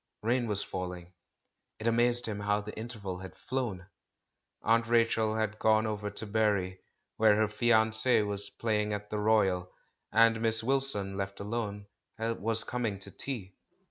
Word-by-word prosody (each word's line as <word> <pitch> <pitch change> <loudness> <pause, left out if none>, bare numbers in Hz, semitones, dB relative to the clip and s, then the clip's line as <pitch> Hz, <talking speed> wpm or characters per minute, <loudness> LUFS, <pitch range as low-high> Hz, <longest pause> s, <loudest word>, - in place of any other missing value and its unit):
Rain 120 +2 +1
was 105 -2 -1
falling. 90 -1 -6 0.6
It 110 - -8
amazed 120 +1 +3
him 105 -2 -3
how 105 0 +1
the 105 +1 -8
interval 105 -5 -6
had 95 0 -9
flown. 120 -9 -3 0.8
"Aunt 115 +1 +3
Rachel" 115 -2 +2
had 110 -1 -1
gone 110 0 +4
over 105 -1 -2
to 105 +2 -6
Bury, 100 -4 +1 0.4
where 110 -1 +5
her 110 0 +3
fiance 110 +1 +3
was 100 -1 -2
playing 105 0 -1
at 105 0 -5
the 105 - -1
Royal, 95 -4 +2 0.4
and 115 0 +5
Miss 110 -1 +1
Wil 135 +3 +2
son, 100 -8 -2
left 100 0 -4
alone, 105 -1 -3 0.3
was 115 0 0
coming 120 -2 -2
in 100 - -9
to 100 - -9
tea. 100 -5 -6
110 Hz, 160 wpm, -30 LUFS, 100-115 Hz, 0.8 s, where